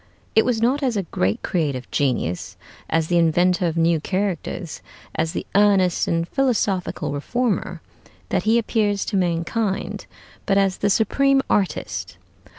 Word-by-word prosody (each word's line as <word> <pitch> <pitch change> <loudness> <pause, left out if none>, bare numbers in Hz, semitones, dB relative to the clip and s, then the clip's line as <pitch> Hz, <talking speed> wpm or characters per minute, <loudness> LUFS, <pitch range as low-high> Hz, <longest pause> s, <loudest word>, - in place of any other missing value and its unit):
It 220 - +4
was 230 -2 0
not 265 +5 +2
as 250 -5 0
a 195 - 0
great 95 - -1
creative 145 -8 -1
genius, 125 - -1 0.3
as 165 0 +1
the 175 +1 +2
inventor 175 +2 +3
of 165 0 -2
new 165 0 +3
characters, 185 -2 -3 0.3
as 160 0 -1
the - - -4
earnest 195 -3 +3
and 165 0 0
philosophical 215 - 0
reformer, 225 - -2 0.5
that - - +1
he 225 +2 +3
appears 210 -3 0
to 210 - -3
mankind, 185 +3 -1 0.4
but 195 - +3
as 195 -1 +2
the 205 - +1
supreme 270 +6 +3
artist. 195 -3 -1
190 Hz, 145 wpm, -22 LUFS, 165-220 Hz, 0.5 s, It